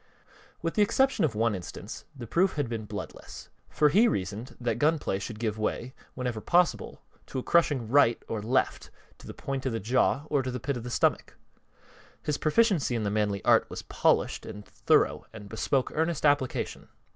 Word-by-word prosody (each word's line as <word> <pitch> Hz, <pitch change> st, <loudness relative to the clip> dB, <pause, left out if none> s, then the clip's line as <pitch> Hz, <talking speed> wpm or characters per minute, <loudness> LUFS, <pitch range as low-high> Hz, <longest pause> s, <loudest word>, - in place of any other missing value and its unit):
With 165 Hz, -, -1 dB
the 210 Hz, -, +2 dB
exception 265 Hz, +1 st, +2 dB
of 125 Hz, -8 st, -2 dB
one 115 Hz, +1 st, +2 dB
instance 90 Hz, -3 st, -7 dB
the 125 Hz, -3 st, -7 dB
proof 185 Hz, -, +2 dB
had 145 Hz, -4 st, -1 dB
been 115 Hz, -2 st, -4 dB
bloodless, -, -, -8 dB, 0.2 s
for 150 Hz, -, +3 dB
he 215 Hz, +10 st, +5 dB
reasoned 105 Hz, -, -3 dB
that 120 Hz, -2 st, -1 dB
gun 155 Hz, +2 st, +3 dB
play 95 Hz, -9 st, -2 dB
should 105 Hz, +2 st, -6 dB
give 110 Hz, -1 st, -2 dB
way, 120 Hz, +4 st, -2 dB, 0.2 s
whenever 125 Hz, -4 st, -3 dB
possible, 175 Hz, +7 st, +1 dB, 0.2 s
to -, -, -6 dB
a 130 Hz, -, -2 dB
crushing 145 Hz, -8 st, +2 dB
"right" 120 Hz, -2 st, +4 dB
or 110 Hz, -2 st, -3 dB
"left" 120 Hz, +5 st, 0 dB, 0.3 s
to -, -, -13 dB
the -, -, -7 dB
point 135 Hz, -1 st, -4 dB
of 125 Hz, -, -1 dB
the 115 Hz, -, -1 dB
jaw 130 Hz, +6 st, +1 dB
or 145 Hz, -3 st, +1 dB
the 130 Hz, -1 st, -4 dB
pit 140 Hz, +4 st, -2 dB
of 120 Hz, -, -5 dB
the 125 Hz, -, -6 dB
stomach. -, -, 0 dB, 0.9 s
His 150 Hz, -, -1 dB
proficiency 160 Hz, -, +2 dB
in 115 Hz, -, -1 dB
the 100 Hz, -, -1 dB
manly 105 Hz, -2 st, -1 dB
art -, -, +4 dB
was -, -, -7 dB
polished -, -, +1 dB
and 105 Hz, 0 st, -9 dB
thorough -, -, +1 dB
and 105 Hz, -2 st, -10 dB
bespoke 125 Hz, +5 st, -1 dB
earnest 160 Hz, -1 st, 0 dB
application. 145 Hz, -3 st, 0 dB
125 Hz, 190 wpm, -28 LUFS, 110-150 Hz, 0.9 s, he